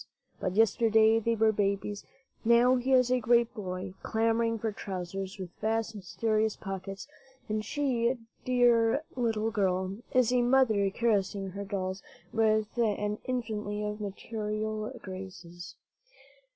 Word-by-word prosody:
But 185 Hz, -1 st, -2 dB
yesterday 225 Hz, 0 st, +4 dB
they 230 Hz, +1 st, 0 dB
were 220 Hz, 0 st, +4 dB
babies; 200 Hz, 0 st, -1 dB, 0.4 s
now 235 Hz, +2 st, +5 dB
he 255 Hz, +2 st, -1 dB
is 250 Hz, -1 st, +4 dB
a 255 Hz, -, +3 dB
great 235 Hz, 0 st, +3 dB
boy, 185 Hz, -3 st, -5 dB
clamoring 230 Hz, +1 st, +1 dB
for 220 Hz, 0 st, -2 dB
trousers 190 Hz, 0 st, -5 dB
with 185 Hz, -3 st, -7 dB
vast, 225 Hz, +1 st, 0 dB
mysterious 215 Hz, +3 st, -1 dB
pockets; 195 Hz, +1 st, -6 dB, 0.4 s
and 215 Hz, 0 st, -1 dB
she, 250 Hz, -1 st, 0 dB, 0.3 s
dear 245 Hz, +1 st, +3 dB
little 225 Hz, -3 st, 0 dB
girl, 190 Hz, -2 st, 0 dB
is 255 Hz, -1 st, +3 dB
a 250 Hz, -, +4 dB
mother, 240 Hz, -5 st, +3 dB
caressing 200 Hz, -3 st, 0 dB
her 200 Hz, +2 st, -6 dB
dolls 190 Hz, -1 st, -3 dB, 0.3 s
with 215 Hz, -1 st, +2 dB
an 210 Hz, -2 st, 0 dB
infinity 215 Hz, -4 st, -3 dB
of 210 Hz, 0 st, -4 dB
maternal 215 Hz, +1 st, -3 dB
graces. 175 Hz, -2 st, -9 dB
215 Hz, 125 wpm, -29 LUFS, 195-230 Hz, 0.4 s, now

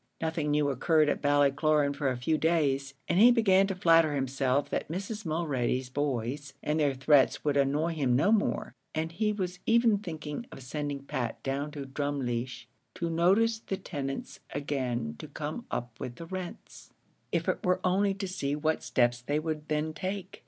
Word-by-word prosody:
Nothing 160 Hz, -2 st, -1 dB
new 145 Hz, -1 st, +2 dB
occurred 155 Hz, +3 st, +3 dB
at -, -, -1 dB
Ballycloran 145 Hz, +1 st, +3 dB
for 140 Hz, -2 st, 0 dB
a 130 Hz, -, -2 dB
few 145 Hz, +6 st, +1 dB
days, 140 Hz, -4 st, +1 dB
and 175 Hz, -, +2 dB
he 235 Hz, +4 st, +9 dB
began 195 Hz, -5 st, +4 dB
to 195 Hz, -, -2 dB
flatter 165 Hz, -4 st, +4 dB
himself 135 Hz, 0 st, 0 dB
that -, -, -1 dB
Mrs. 195 Hz, +4 st, -5 dB
Mulready's 130 Hz, -6 st, -1 dB
boys 135 Hz, 0 st, -2 dB
and 150 Hz, +1 st, 0 dB
their 145 Hz, -3 st, +2 dB
threats 135 Hz, +1 st, +3 dB
would 145 Hz, -1 st, +2 dB
annoy 145 Hz, +4 st, +2 dB
him 135 Hz, -6 st, +1 dB
no 160 Hz, +11 st, +3 dB
more, 220 Hz, -2 st, +1 dB, 0.2 s
and 160 Hz, +1 st, -1 dB
he 210 Hz, +5 st, 0 dB
was 180 Hz, -3 st, -3 dB
even 230 Hz, -2 st, +4 dB
thinking 160 Hz, +2 st, -6 dB
of 135 Hz, -, -10 dB
sending 145 Hz, +1 st, -4 dB
Pat 120 Hz, -4 st, -4 dB
down 140 Hz, +2 st, -2 dB
to 140 Hz, -2 st, -5 dB
Drumleesh 130 Hz, -3 st, -3 dB, 0.3 s
to 170 Hz, -1 st, -2 dB
notice 200 Hz, +7 st, +3 dB
the 195 Hz, -3 st, -4 dB
tenants 135 Hz, -7 st, -5 dB, 0.2 s
again 125 Hz, -, -2 dB
to -, -, -7 dB
come -, -, -5 dB
up 120 Hz, -2 st, -4 dB
with 120 Hz, -, -5 dB
the 165 Hz, -, -8 dB
rents, 185 Hz, 0 st, -8 dB, 0.4 s
if -, -, 0 dB
it -, -, 0 dB
were 180 Hz, 0 st, +2 dB
only 195 Hz, +2 st, +2 dB
to 195 Hz, 0 st, -4 dB
see 145 Hz, -6 st, -2 dB
what 155 Hz, +1 st, 0 dB
steps 120 Hz, -1 st, +1 dB
they 145 Hz, +4 st, -1 dB
would 155 Hz, -1 st, -3 dB
then 155 Hz, +1 st, -1 dB
take. 190 Hz, +1 st, -5 dB
150 Hz, 180 wpm, -29 LUFS, 135-175 Hz, 0.4 s, he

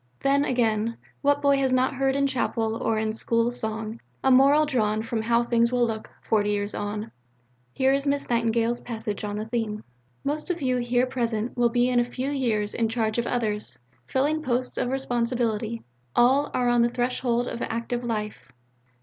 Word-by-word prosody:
Then, 280 Hz, +1 st, +3 dB
again, 230 Hz, -2 st, 0 dB, 0.2 s
what 285 Hz, 0 st, +2 dB
boy 280 Hz, -1 st, +4 dB
has 265 Hz, -1 st, +1 dB
not 255 Hz, 0 st, +2 dB
heard 270 Hz, 0 st, +1 dB
in 280 Hz, 0 st, +2 dB
Chapel 230 Hz, -4 st, 0 dB
or 225 Hz, -1 st, 0 dB
in 215 Hz, 0 st, -1 dB
school 230 Hz, +1 st, +1 dB
song 220 Hz, -1 st, -4 dB, 0.2 s
a 265 Hz, -, +4 dB
moral 280 Hz, +4 st, +6 dB
drawn 220 Hz, -6 st, 0 dB
from 225 Hz, -1 st, -2 dB
how 235 Hz, +1 st, +2 dB
things 235 Hz, 0 st, +2 dB
will 245 Hz, -1 st, +3 dB
look 220 Hz, -1 st, -4 dB
"forty 210 Hz, -2 st, +1 dB
years 205 Hz, 0 st, -1 dB
on"? 210 Hz, +2 st, -4 dB, 0.6 s
Here 265 Hz, -, +2 dB
is 280 Hz, +1 st, 0 dB
Miss 280 Hz, 0 st, 0 dB
Nightingale's 235 Hz, 0 st, +1 dB
passage 220 Hz, -3 st, -4 dB
on 205 Hz, 0 st, -3 dB
the 215 Hz, -, -3 dB
theme: 220 Hz, -2 st, -3 dB, 0.4 s
Most 300 Hz, +5 st, -2 dB
of 350 Hz, -1 st, -1 dB
you 255 Hz, -3 st, +1 dB
here 245 Hz, +1 st, +1 dB
present 235 Hz, -3 st, -2 dB
will 240 Hz, -1 st, +3 dB
be 245 Hz, +1 st, +2 dB
in 250 Hz, -1 st, +2 dB
a -, -, +4 dB
few 255 Hz, +3 st, -3 dB
years 225 Hz, -7 st, 0 dB
in 225 Hz, -1 st, 0 dB
charge 225 Hz, -1 st, 0 dB
of 235 Hz, -, -1 dB
others, 210 Hz, -, -2 dB, 0.3 s
filling 295 Hz, +4 st, +1 dB
posts 250 Hz, -2 st, -1 dB
of 245 Hz, -, 0 dB
responsibility. 235 Hz, -3 st, -1 dB, 0.3 s
All 265 Hz, +4 st, +4 dB
are 250 Hz, -1 st, 0 dB
on 240 Hz, 0 st, +4 dB
the 235 Hz, -, +3 dB
threshold 245 Hz, 0 st, 0 dB
of 235 Hz, -, -5 dB
active 235 Hz, +1 st, -3 dB
life. 210 Hz, -, -4 dB
240 Hz, 185 wpm, -25 LUFS, 220-255 Hz, 0.6 s, moral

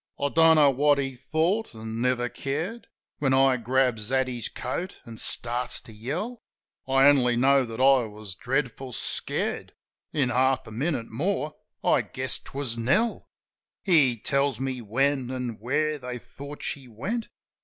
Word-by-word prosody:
I 140 Hz, -, +1 dB
don't 165 Hz, +1 st, +6 dB
know 145 Hz, -3 st, +6 dB
what 145 Hz, +2 st, +3 dB
he 135 Hz, -1 st, -2 dB
thought, 160 Hz, -, -1 dB
an' 110 Hz, +1 st, -5 dB
never 125 Hz, -1 st, +1 dB
cared. 160 Hz, -, -4 dB, 0.3 s
When 135 Hz, -2 st, +2 dB
I 135 Hz, -1 st, +5 dB
grabs 120 Hz, -2 st, +1 dB
at 130 Hz, -1 st, +2 dB
his 120 Hz, -3 st, -4 dB
coat, 175 Hz, +9 st, -5 dB
an' 115 Hz, -2 st, -9 dB
starts 120 Hz, +3 st, -2 dB
to 110 Hz, -, -13 dB
yell. 165 Hz, -, -4 dB, 0.5 s
I 135 Hz, 0 st, +4 dB
only 125 Hz, -4 st, +5 dB
know 135 Hz, +2 st, +4 dB
that 115 Hz, 0 st, -7 dB
I 130 Hz, -2 st, +5 dB
was 105 Hz, -2 st, -7 dB
dreadful 130 Hz, +2 st, -2 dB
scared.... -, -, -2 dB, 0.4 s
In 140 Hz, -5 st, +1 dB
half 130 Hz, +1 st, +2 dB
a -, -, -10 dB
minute 125 Hz, 0 st, -2 dB
more, 150 Hz, -, -1 dB, 0.3 s
I -, -, +4 dB
guessed -, -, -3 dB
'twas 130 Hz, -4 st, -3 dB
Nell. 215 Hz, -, +1 dB, 0.6 s
He 145 Hz, -, +4 dB
tells 140 Hz, +4 st, 0 dB
me 130 Hz, -2 st, -3 dB
when 130 Hz, +4 st, 0 dB
an' 125 Hz, -3 st, -4 dB
where 150 Hz, +6 st, 0 dB
they 125 Hz, -1 st, -5 dB
thought 140 Hz, +4 st, -10 dB
she 135 Hz, -3 st, -4 dB
went. 150 Hz, -, -4 dB
130 Hz, 155 wpm, -26 LUFS, 120-145 Hz, 0.6 s, don't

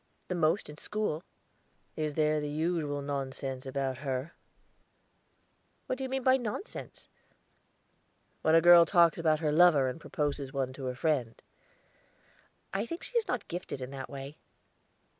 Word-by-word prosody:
"The -, -, 0 dB
most 170 Hz, +2 st, +1 dB
in 150 Hz, 0 st, -11 dB
school." 210 Hz, -7 st, -2 dB, 0.7 s
"Is 155 Hz, -2 st, -2 dB
there 155 Hz, -1 st, +2 dB
the 150 Hz, -, -3 dB
usual 150 Hz, -2 st, -1 dB
nonsense 135 Hz, -1 st, -4 dB
about 130 Hz, -1 st, -2 dB
her?" 135 Hz, +2 st, -3 dB, 1.5 s
"What 255 Hz, -, -3 dB
do -, -, -3 dB
you 260 Hz, -, -3 dB
mean 265 Hz, 0 st, -2 dB
by 260 Hz, +1 st, +5 dB
nonsense?" 245 Hz, -, -6 dB, 1.3 s
"When 160 Hz, +1 st, +4 dB
a 165 Hz, -, +7 dB
girl 175 Hz, 0 st, +8 dB
talks 170 Hz, 0 st, +4 dB
about 155 Hz, -1 st, +2 dB
her 155 Hz, -2 st, +1 dB
lover 155 Hz, -4 st, +6 dB
or 130 Hz, -, -1 dB
proposes 145 Hz, -3 st, -3 dB
one 135 Hz, -2 st, -2 dB
to 135 Hz, 0 st, -7 dB
her 125 Hz, -1 st, -2 dB
friend." 130 Hz, -4 st, 0 dB, 1.3 s
"I 200 Hz, +4 st, -1 dB
think 335 Hz, +6 st, -6 dB
she -, -, -11 dB
is 465 Hz, -2 st, +2 dB
not 245 Hz, -4 st, -2 dB
gifted 175 Hz, -5 st, -5 dB
that 135 Hz, +1 st, -6 dB
way." 140 Hz, +1 st, -8 dB
155 Hz, 150 wpm, -30 LUFS, 135-175 Hz, 1.5 s, girl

